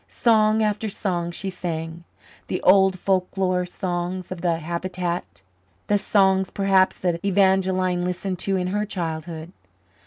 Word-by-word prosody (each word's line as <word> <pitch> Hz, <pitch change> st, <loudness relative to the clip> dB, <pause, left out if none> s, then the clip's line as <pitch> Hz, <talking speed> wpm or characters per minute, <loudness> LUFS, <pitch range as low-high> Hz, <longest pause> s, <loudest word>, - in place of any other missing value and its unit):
Song 220 Hz, -1 st, +3 dB
after 215 Hz, +1 st, -1 dB
song 175 Hz, -4 st, -2 dB
she 190 Hz, +3 st, -5 dB
sang 165 Hz, -1 st, -5 dB, 0.4 s
the 180 Hz, -, -2 dB
old 190 Hz, 0 st, +5 dB
folklore 185 Hz, -1 st, 0 dB
songs 180 Hz, 0 st, -4 dB
of 180 Hz, -2 st, -5 dB
the 170 Hz, -2 st, +1 dB
habitant, 175 Hz, -, -4 dB, 0.4 s
the 205 Hz, -, +2 dB
songs 190 Hz, -2 st, +2 dB
perhaps 195 Hz, -1 st, +2 dB
that 175 Hz, -2 st, -2 dB
Evangeline 190 Hz, -2 st, +2 dB
listened 180 Hz, +1 st, -3 dB
to 195 Hz, 0 st, 0 dB
in 180 Hz, -1 st, 0 dB
her 205 Hz, +2 st, 0 dB
childhood. 165 Hz, -4 st, -5 dB
185 Hz, 130 wpm, -23 LUFS, 175-195 Hz, 0.4 s, old